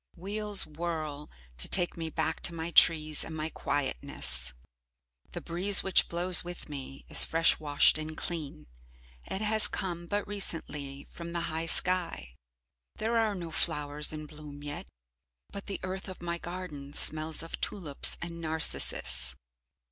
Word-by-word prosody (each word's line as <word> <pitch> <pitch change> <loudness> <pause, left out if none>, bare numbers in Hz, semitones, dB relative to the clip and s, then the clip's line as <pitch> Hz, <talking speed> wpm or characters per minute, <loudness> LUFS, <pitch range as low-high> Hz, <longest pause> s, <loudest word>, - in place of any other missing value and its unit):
Wheels 205 +3 0
whirl 155 -2 -5 0.3
to - - +3
take 180 -2 +4
me 165 -1 -4
back 160 0 -2
to 170 - 0
my 165 +1 -4
trees 155 -3 +5
and 160 - -7
my 155 +1 -3
quietness. 65 - -1 0.8
The - - -5
breeze 190 +4 +5
which 190 -2 +3
blows 175 +1 +5
with 175 0 -8
me 135 -2 -8
is - - +8
fresh 165 0 +3
washed 150 0 +4
and 155 0 -6
clean, 150 - -5 0.6
it 190 - -4
has 215 0 +4
come 175 -2 -5
but 205 +3 -2
recently 150 -8 -3
from 170 0 -9
the 170 - -2
high 165 +1 -2
sky. 170 - +1 0.6
There 225 +2 -2
are 220 -2 0
no 170 -3 -7
flowers 150 -2 0
in 155 0 -7
bloom 150 -1 -11
yet, 145 - -6 0.6
but 200 - -7
the 200 - -4
earth 185 +1 -5
of 185 - -9
my 170 0 -4
garden 170 -6 -8
smells 155 +1 0
of 165 - -8
tulips 160 -9 +1
and 170 -1 -7
narcissus. 160 - 0
165 Hz, 150 wpm, -29 LUFS, 150-180 Hz, 0.8 s, is